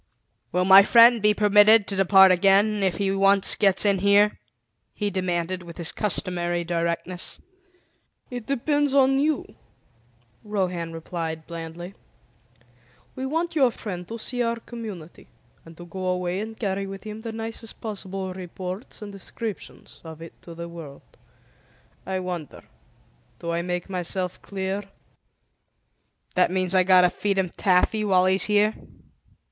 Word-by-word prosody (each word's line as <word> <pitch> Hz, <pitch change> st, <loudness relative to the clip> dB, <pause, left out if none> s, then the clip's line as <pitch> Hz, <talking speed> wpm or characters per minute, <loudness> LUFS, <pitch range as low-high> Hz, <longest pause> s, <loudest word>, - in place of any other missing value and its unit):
"Will 180 Hz, 0 st, +1 dB
my 190 Hz, +1 st, +9 dB
friend 235 Hz, +2 st, +6 dB
be 210 Hz, 0 st, +3 dB
permitted 210 Hz, +1 st, +5 dB
to 200 Hz, -, -2 dB
depart 190 Hz, 0 st, +6 dB
again, 200 Hz, +3 st, +3 dB
if 190 Hz, -2 st, 0 dB
he 195 Hz, -1 st, 0 dB
once 195 Hz, 0 st, +4 dB
gets 195 Hz, -1 st, +3 dB
in 200 Hz, -2 st, +2 dB
here?" 200 Hz, +2 st, +3 dB, 0.6 s
he 205 Hz, -1 st, -2 dB
demanded 185 Hz, -1 st, -2 dB
with 170 Hz, -1 st, -11 dB
his 170 Hz, -1 st, -3 dB
customary 175 Hz, -4 st, -2 dB
directness. 170 Hz, +1 st, -3 dB, 0.9 s
"It 245 Hz, -3 st, -7 dB
depends 285 Hz, +1 st, 0 dB
on 270 Hz, 0 st, +4 dB
you," 300 Hz, -1 st, 0 dB, 1.0 s
Rohan 180 Hz, -5 st, -3 dB
replied 165 Hz, -1 st, -6 dB
blandly. 170 Hz, +2 st, -8 dB, 1.2 s
"We 265 Hz, 0 st, -4 dB
want 330 Hz, +4 st, -2 dB
your 270 Hz, -5 st, +4 dB
friend 180 Hz, -6 st, -7 dB
to 230 Hz, -, -6 dB
see 245 Hz, +2 st, -3 dB
our 230 Hz, -1 st, 0 dB
Community, 215 Hz, -9 st, -10 dB, 0.4 s
and 165 Hz, 0 st, -14 dB
to 175 Hz, -, -10 dB
go 185 Hz, +2 st, -6 dB
away 180 Hz, 0 st, -1 dB
and 220 Hz, +1 st, -7 dB
carry 195 Hz, -2 st, -2 dB
with 195 Hz, 0 st, -9 dB
him 215 Hz, 0 st, -8 dB
the 225 Hz, 0 st, -6 dB
nicest 225 Hz, 0 st, -7 dB
possible 195 Hz, -3 st, -6 dB
reports 185 Hz, +4 st, -8 dB
and 205 Hz, -, -8 dB
descriptions 205 Hz, +2 st, -8 dB
of 160 Hz, -1 st, -10 dB
it 165 Hz, 0 st, -11 dB
to 170 Hz, -, -12 dB
the 170 Hz, 0 st, -7 dB
world. 165 Hz, -5 st, -12 dB, 0.9 s
I 190 Hz, -1 st, -2 dB
wonder, 175 Hz, -5 st, -6 dB, 0.7 s
do 170 Hz, -, -5 dB
I 170 Hz, 0 st, -1 dB
make 180 Hz, 0 st, -4 dB
myself 180 Hz, -1 st, -3 dB
clear?" 195 Hz, 0 st, -4 dB, 1.5 s
"That 180 Hz, -, +3 dB
means 185 Hz, 0 st, -1 dB
I've 185 Hz, -1 st, +3 dB
got 185 Hz, -1 st, +7 dB
to 180 Hz, -1 st, +3 dB
feed 200 Hz, -1 st, -2 dB
him 190 Hz, -2 st, 0 dB
taffy 190 Hz, +5 st, +1 dB
while 185 Hz, -3 st, +3 dB
he's 190 Hz, +1 st, +2 dB
here?" 210 Hz, +1 st, +3 dB
190 Hz, 145 wpm, -24 LUFS, 180-210 Hz, 1.5 s, my